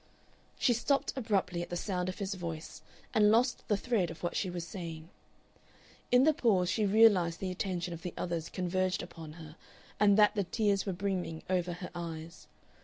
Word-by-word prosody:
She 245 - +3
stopped 275 +4 +1
abruptly 195 -8 0
at 175 - -6
the 175 - -3
sound 180 -1 -2
of 185 - -5
his 200 -1 -3
voice, 170 -3 -6 0.3
and 210 -1 +5
lost 235 +3 +2
the 210 - +2
thread 205 -6 0
of 165 - -10
what 175 - -2
she 190 - 0
was 175 -1 -4
saying. 165 -3 -7 1.0
In 250 +1 +6
the 310 +2 +5
pause 190 -10 +2
she 215 -2 +1
realized 195 -5 +5
the 190 -1 -3
attention 180 -2 -3
of 165 - -8
the 180 -1 -6
others 170 -2 -3
converged 185 0 -1
upon 165 -3 -9
her, 160 -2 -11 0.4
and 205 -1 +5
that 210 -1 +6
the 205 -2 0
tears 200 +1 0
were - - +1
brimming 180 -4 -3
over 180 -1 0
her 180 +1 -7
eyes. 165 -1 -7
185 Hz, 185 wpm, -31 LUFS, 170-205 Hz, 1.0 s, In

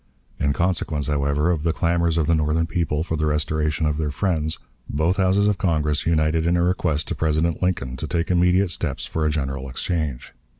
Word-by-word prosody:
In 70 0 +1
consequence, 80 -2 0
however, 75 +3 +1
of 80 -4 -1
the 80 +1 0
clamors 85 -1 +1
of 80 - +2
the 85 - +2
Northern 80 +1 +1
people 80 -2 -1
for 80 - -3
the 75 0 0
restoration 75 0 0
of 75 -1 0
their 75 -2 -1
friends, 80 0 0 0.3
both 80 +7 +1
Houses 95 +2 +3
of 105 -2 +1
Congress 75 -7 0
united 80 0 +2
in 85 +1 +3
a 85 - +2
request 85 -4 0
to - - -1
President 80 +1 0
Lincoln 70 -9 -1
to - - -4
take 85 +1 -1
immediate 90 +1 +3
steps - - -3
for 80 -1 -1
a - - +2
general 70 -3 -3
exchange. 75 -2 -3
80 Hz, 200 wpm, -23 LUFS, 75-85 Hz, 0.3 s, Houses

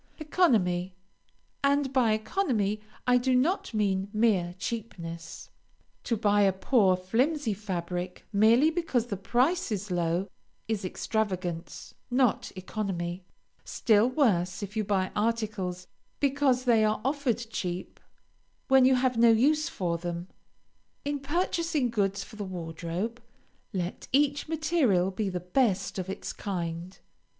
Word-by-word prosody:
ECONOMY 195 - +1 0.7
And 280 -1 +2
by 240 -5 +4
economy 215 - 0 0.2
I 250 0 +4
do 255 +1 +2
not 320 +10 +1
mean 200 -3 0
mere 205 -6 +2
cheapness. 170 -7 -6 0.5
To 230 - 0
buy 205 -1 +3
a 195 -1 +5
poor, 190 -1 +3
flimsy 235 - 0
fabric 180 -2 -4
merely 230 +9 +5
because 320 -9 0
the 230 -4 -4
price 255 - +1
is 205 -1 -3
low, 175 +2 0 0.4
is 220 -3 -2
extravagance, 185 -3 -3 0.2
not 250 -2 +1
economy; 185 -2 -4 0.4
still 220 0 +3
worse 205 - +1
if 205 +2 -7
you 215 - +1
buy 195 -2 0
articles 210 -5 -1 0.3
because 275 -2 +2
they 230 -3 +4
are 215 0 +1
offered 275 -4 +1
cheap, 180 -3 -4 0.7
when 265 -1 +6
you 260 0 +5
have 255 -1 +1
no 235 0 +7
use 300 +8 +3
for 170 -3 -2
them. 175 +1 -5 0.8
In 290 0 -1
purchasing 320 -2 0
goods 200 -3 0
for 215 - -13
the 210 - -3
wardrobe, 180 +5 -4 0.5
let 180 -3 -4
each 285 +2 +2
material 305 - +2
be 200 +1 -2
the 180 -1 -3
best 195 +1 0
of 185 0 -4
its 195 - -5
kind. 175 -1 -4
215 Hz, 130 wpm, -28 LUFS, 185-255 Hz, 0.8 s, no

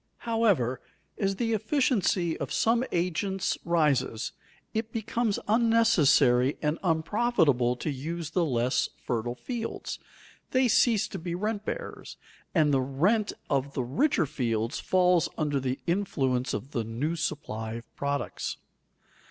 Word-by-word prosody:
However, 205 - +2 0.4
as 195 -1 +1
the 230 +2 0
efficiency 215 - +1
of - - -4
some 230 +2 +2
agents 185 +2 0
rises, 140 -8 +1 0.4
it 220 0 -2
becomes 225 -1 -1
unnecessary 200 - +4
and 150 +2 -1
unprofitable 160 - +2
to 150 +5 -3
use 155 +4 -5
the 180 - +2
less 125 -4 +1 0.2
fertile 120 0 -2
fields; 235 - -5 0.5
they 260 0 +3
cease 230 -2 +3
to - - -6
be 170 +1 -4
rent 210 +2 -2
bearers, - - -6 0.4
and 150 -4 +4
the 135 - +3
rent 180 - +1 0.2
of 140 0 -1
the 130 - 0
richer 185 - +2
fields 115 -5 -2
falls 180 -2 +3
under 145 -3 0
the 130 0 -2
influence 135 -9 0
of 135 - -6
the 120 -4 -1
new 125 +9 -2
supply 110 -9 -3
of 115 +1 -9
products. 140 0 -3
165 Hz, 130 wpm, -28 LUFS, 130-215 Hz, 0.5 s, unnecessary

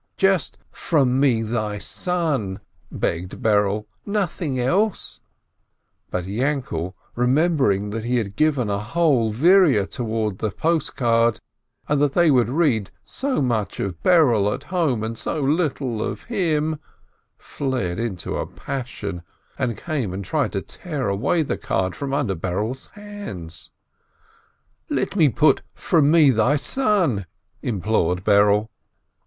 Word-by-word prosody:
"Hush! - - -50
Just 190 -6 +2
'from 135 -5 +1
me, 125 -5 +3
thy 110 -2 -2
son,' 145 - -1 0.2
" - - -38
begged 90 +2 -3
Berele, 105 -1 +2 0.2
"nothing 180 -9 -2
else 190 - 0
I" - - -46 0.8
But 90 -1 -3
Yainkele, 105 - -2 0.2
remembering 125 - +2
that 110 +1 -4
he 125 +1 +1
had 100 -4 -3
given 145 -5 +2
a 100 -1 -1
whole 125 -1 +2
vierer 150 - +5
toward 110 -5 -2
the 110 - -1
post 160 - -1
card, 115 -2 +2 0.5
and 145 -1 +1
that 145 -2 +2
they 170 -3 +4
would 125 -3 +3
read 130 - +1 0.2
so 265 - -1
much 115 -5 -1
of 90 -4 -3
Berele 125 - +4
at 135 - -10
home, 155 - 0
and 115 +1 -3
so 155 - -3
little 140 -6 0
of - - -4
him, 160 -8 0 0.6
flew 135 -2 -3
into 95 -1 -3
a - - -3
passion, 110 -9 -5 0.4
and 120 -3 -1
came 130 - -3
and 100 0 -5
tried - - -1
to - - -2
tear 145 - -4
away 140 - +1
the 140 - -3
card 95 -1 -1
from 140 -1 -4
under 140 -8 0
Berele's 100 +9 -3
hands. 205 - -8 1.2
"Let - - -1
me 160 -7 +5
put 145 +1 +3
'from 155 -4 +2
me, 155 -3 +6
thy 120 +5 +3
son' 175 - +1 0.2
!" - - -43
implored 95 -5 0
Berele. 105 +1 +4
125 Hz, 140 wpm, -22 LUFS, 105-155 Hz, 1.2 s, me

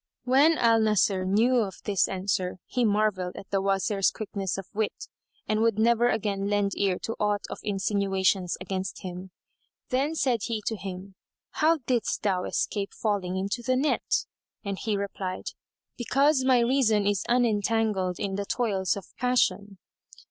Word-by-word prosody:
When 280 +6 +4
al 230 -1 +4
Nasir 205 -3 +2
knew 225 +7 +3
of 205 -5 0
this 200 -3 +2
answer, 185 -1 -2
he 250 - -1
marvelled 205 -4 +1
at 195 - -10
the 195 -1 +1
Wazir's 195 0 +1
quickness 195 -3 -4
of 195 - -6
wit 215 0 -3 0.4
and 215 0 +1
would 225 -2 +2
never 235 +2 +3
again 200 -3 -1
lend 205 -1 +1
ear 195 -2 +1
to 225 - -3
aught 205 -1 0
of - - -6
insinuations 195 -2 0
against 185 +1 -4
him. 185 0 -7 0.6
Then 275 +5 0
said 260 -6 +1
he 225 -3 -3
to 225 - -1
him, 195 -1 -7 0.4
"How 325 +2 +3
didst 245 -3 0
thou 190 -3 0
escape 200 -1 -2
falling 195 -4 -1
into 200 +5 -2
the 255 +2 +1
net?" 280 +4 0 0.4
And 200 -1 -3
he 215 -3 -1
replied, 195 -2 -4 0.5
"Because 275 +3 +2
my 255 -2 +4
reason 235 -4 +2
is 200 -2 +1
unentangled 220 -5 +1
in 195 -1 -2
the 200 - -2
toils 200 -6 0
of 195 - -7
passion." 235 -5 +1
205 Hz, 155 wpm, -27 LUFS, 195-235 Hz, 0.6 s, When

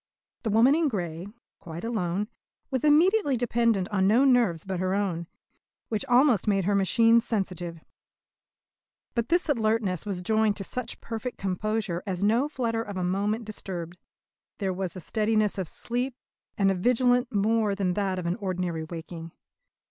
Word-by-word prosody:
The 225 - -2
woman 230 +6 +5
in 325 0 +2
grey, 175 - -3 0.3
quite 165 0 -8
alone, 210 -3 -1 0.4
was 260 -2 -1
immediately 305 - +4
dependent 230 -5 +1
on 190 -2 +2
no 235 +7 +5
nerves 235 - +3
but 190 -2 -3
her 185 +1 0
own, 180 -5 -1 0.6
which 220 +1 -1
almost 250 -5 +4
made 195 -3 +2
her 205 - +2
machine 230 +4 +4
sensitive. 180 -7 -3 1.3
But 235 +1 -1
this 345 +1 +2
alertness 220 - +1
was 185 -3 -3
joined 220 +1 +2
to 200 - -4
such 240 +4 -5
perfect 235 +2 -5
composure 195 -1 -2
as 185 0 -2
no 235 +8 +2
flutter 230 -5 -1
of 205 -3 -6
a 185 - -1
moment 205 +5 -1
disturbed. 180 -5 -6 0.6
There 195 -3 -1
was 185 -1 -3
the 185 - -8
steadiness 215 +1 0
of 185 - -2
sleep, 245 - -3 0.4
and 195 -1 +3
a - - +2
vigilance 245 +5 +2
more 215 -1 +1
than 190 -3 0
that 195 -1 -1
of 180 - -4
an 170 +3 -1
ordinary 180 -5 -2
waking. 165 0 -8
205 Hz, 160 wpm, -27 LUFS, 185-235 Hz, 1.3 s, woman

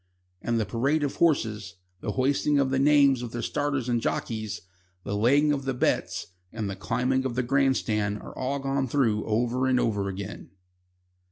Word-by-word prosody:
And 115 -1 0
the 110 - 0
parade 135 +9 0
of 145 - 0
the - - -14
horses, 110 - +1 0.2
the 105 - -3
hoisting 140 +2 +1
of 135 -2 +2
the 135 - +1
names 140 -2 +5
of 120 -2 -6
the 120 -1 -3
starters 145 -4 -1
and 120 -2 +1
jockeys, 110 -3 -3 0.4
the 100 - -3
laying 140 +8 +4
of 140 -2 -3
the 135 -1 -1
bets, - - 0 0.3
and 110 -2 -4
the 100 - -4
climbing 125 +6 0
of 130 -3 -3
the 125 - 0
grand 135 +1 +2
stand 105 -2 -1
are - - -11
all 130 +2 -2
gone 135 -1 -1
through 115 -5 +1
over 120 +4 0
and 130 -1 +3
over 100 -4 0
again. 100 +1 -7
125 Hz, 190 wpm, -26 LUFS, 110-135 Hz, 0.4 s, names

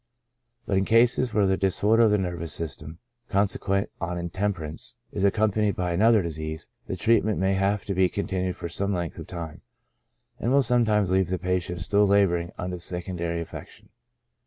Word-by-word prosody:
But 95 - +1
in 95 - 0
cases 120 +2 +3
where 105 -2 +2
the 95 0 +2
disorder 105 +4 +2
of 115 - +6
the 105 - +3
nervous 85 -5 -3
system, 75 0 -5 0.3
consequent 100 0 0
on 90 -1 -2
intemperance, 85 -3 -3 0.2
is - - -3
accompa 105 +1 +2
nied 105 -2 +2
by 90 -1 -1
another 110 +3 +4
disease, 80 -1 -5 0.2
the - - -3
treatment 110 +2 +2
may 95 +1 +1
have 100 +1 0
to 100 - -2
be 95 -1 +3
con 100 - -3
tinued 95 -1 -2
for - - -5
some 100 +3 -1
length 85 -2 -4
of - - -8
time, 85 -4 -7 0.8
and 120 - -1
will 140 0 +4
sometimes 110 -6 +2
leave 95 -2 +2
the 95 - 0
patient 90 -1 -2
still 100 +5 +3
laboring 90 -4 +2
under 90 0 -4
the - - -7
secondary 85 -1 -2
affection. 85 - -10
95 Hz, 185 wpm, -26 LUFS, 85-105 Hz, 0.8 s, of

